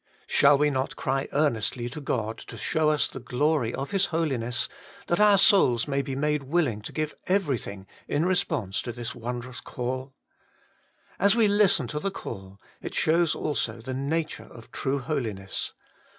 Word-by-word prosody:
Shall 140 0 +5
we 150 +1 +3
not 130 0 -2
cry 135 +1 -1
earnestly 120 -4 +1
to 150 +5 -7
God 115 -5 -2
to - - -10
show 155 -1 +1
us 150 -1 +2
the - - -8
glory 130 0 +1
of 135 +7 -4
His 195 -1 +2
Holiness, 135 -8 0 0.4
that 175 - 0
our 210 -1 +6
souls 170 - +5
may 140 -1 +1
be 135 -1 -4
made 150 +1 0
willing 135 -6 0
to - - -7
give 155 -1 -2
everything 135 - -1 0.2
in 155 +4 +1
response 160 - 0
to 120 - -5
this 120 +3 -5
wondrous 125 +1 -6
call? 130 +2 -4 1.0
As 200 +2 +5
we 230 -2 +5
listen 200 -8 +4
to 150 - -3
the 195 - -1
call, 100 - -8 0.2
it - - -6
shows 165 0 +3
also 120 -6 -2
the 130 +3 -5
nature 155 +4 -2
of 115 -1 -13
true 135 +1 -1
Holiness. 115 -9 -3
140 Hz, 165 wpm, -27 LUFS, 120-160 Hz, 1.0 s, our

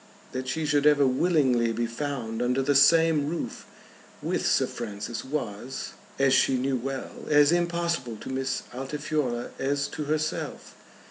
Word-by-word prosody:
That 130 0 -4
she 160 +4 -1
should 145 0 +3
ever 145 -2 +5
willingly 130 -4 +2
be 115 +1 -1
found 115 -2 -4
under 125 +2 +1
the 145 - +2
same 155 +1 +5
roof 170 - -5 0.5
with - - -1
Sir - - +3
Francis 110 0 -5
was, 130 -3 -4 0.3
as 135 -1 +3
she 135 0 +4
knew 130 +1 0
well, 135 +2 -5
as 145 0 +6
impossible 170 -7 0
to - - -9
Miss 130 0 -2
Altifiorla 135 -2 -2
as 140 +1 0
to 150 - -5
herself. 155 +1 -3
135 Hz, 145 wpm, -27 LUFS, 125-150 Hz, 0.5 s, as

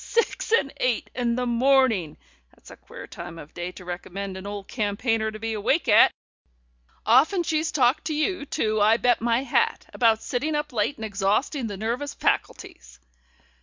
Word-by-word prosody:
Six 465 -1 -1
and 280 -12 +2
eight 250 -2 -1
in 240 -2 -1
the 250 0 -1
morning! 240 - +2 0.4
That's - - -17
a - - -10
queer - - -11
time 165 - -9
of 150 -2 -12
day 175 +1 -5
to 180 - -12
recommend 185 +2 -6
an 190 +1 -8
old 205 -1 -6
campaigner 220 0 -1
to 215 - -8
be 225 +1 -3
awake 265 +8 0
at! 210 - +7 1.0
Often 295 - +4
she's 315 0 -1
talked 265 +1 +2
to 310 - -2
you, 310 0 -1
too, 215 -4 0
I 220 +2 +5
bet 245 -1 +2
my 235 +2 +1
hat, 270 - 0
about 225 -2 +2
sitting 300 +5 -2
up 295 -2 -3
late 225 +5 0
and 220 - -6
exhausting 215 +6 -1
the 205 -2 -6
nervous 235 +7 -3
faculties." 60 0 -3
230 Hz, 175 wpm, -25 LUFS, 205-275 Hz, 1.0 s, at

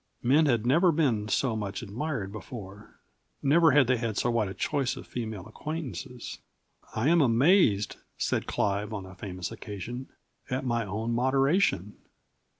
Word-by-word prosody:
Men 150 +6 +4
had 120 -4 +2
never 170 +8 +5
been 130 -10 +1
so 115 +2 +1
much 100 -1 -4
admired 115 -1 -3
before. 105 -1 -10 0.4
Never 160 +4 +5
had 145 -1 +5
they 130 +1 +2
had 115 -3 -2
so 120 - +1
wide 115 -3 +1
a 95 - -6
choice 135 +5 0
of - - -8
female 110 -6 -5
acquaintances. 135 0 -6 0.6
"I 110 +5 +1
am 170 0 +5
amazed," 120 - +4 0.2
said - - -1
Clive 105 +2 -1
on 100 -3 -5
a 95 - -11
famous 90 -2 -6
occasion, 120 +6 -7 0.4
"at 130 +1 -2
my 120 -2 0
own 110 +4 -2
moderation." 130 - +2
120 Hz, 150 wpm, -28 LUFS, 105-135 Hz, 0.6 s, never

